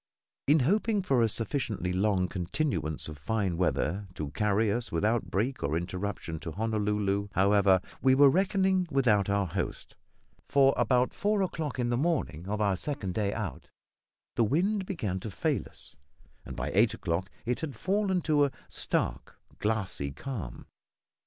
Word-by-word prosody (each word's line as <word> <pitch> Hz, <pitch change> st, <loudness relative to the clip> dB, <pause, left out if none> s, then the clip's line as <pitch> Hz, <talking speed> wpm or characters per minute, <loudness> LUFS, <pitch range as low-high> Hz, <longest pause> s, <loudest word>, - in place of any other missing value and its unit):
In 150 Hz, +1 st, +5 dB
hoping 205 Hz, -, +2 dB
for 135 Hz, -9 st, +2 dB
a 115 Hz, -, +3 dB
sufficiently 110 Hz, -5 st, -2 dB
long 95 Hz, -1 st, +2 dB
continuance 90 Hz, -, -2 dB
of 75 Hz, -2 st, -8 dB
fine 100 Hz, +2 st, -1 dB
weather 90 Hz, +2 st, 0 dB
to 75 Hz, -2 st, -4 dB
carry 105 Hz, +4 st, +1 dB
us 115 Hz, +1 st, -1 dB
without 105 Hz, +3 st, 0 dB
break 110 Hz, +9 st, -1 dB
or 75 Hz, +3 st, 0 dB
interruption 90 Hz, -2 st, -4 dB
to 80 Hz, 0 st, -6 dB
Honolulu, 105 Hz, -1 st, 0 dB
however, 100 Hz, -1 st, +4 dB, 0.2 s
we 130 Hz, -1 st, +5 dB
were 140 Hz, +1 st, +7 dB
reckoning 190 Hz, 0 st, +2 dB
without 115 Hz, -9 st, +3 dB
our 100 Hz, 0 st, +2 dB
host; 90 Hz, +1 st, -4 dB, 0.5 s
for 135 Hz, -1 st, +5 dB
about 125 Hz, -1 st, +2 dB
four 205 Hz, 0 st, +1 dB
o'clock 160 Hz, -7 st, -3 dB
in 120 Hz, -1 st, 0 dB
the 120 Hz, -, +1 dB
morning 125 Hz, -, -1 dB
of 105 Hz, +1 st, -2 dB
our 100 Hz, -3 st, +2 dB
second 95 Hz, -, -4 dB
day 100 Hz, -1 st, 0 dB
out, 100 Hz, -, -5 dB, 0.7 s
the 115 Hz, -, +3 dB
wind 185 Hz, -, +1 dB
began 105 Hz, -, -2 dB
to 110 Hz, -, -6 dB
fail 95 Hz, -, 0 dB
us, -, -, -15 dB, 0.5 s
and -, -, -7 dB
by -, -, -3 dB
eight 105 Hz, +3 st, +4 dB
o'clock 90 Hz, +2 st, -2 dB, 0.2 s
it 125 Hz, +1 st, -1 dB
had 155 Hz, -4 st, -5 dB
fallen 190 Hz, -2 st, 0 dB
to 150 Hz, -3 st, +3 dB
a 140 Hz, -, -2 dB, 0.2 s
stark, -, -, -2 dB, 0.2 s
glassy 105 Hz, -9 st, -1 dB
calm. 95 Hz, -, -6 dB
110 Hz, 160 wpm, -29 LUFS, 95-140 Hz, 0.7 s, were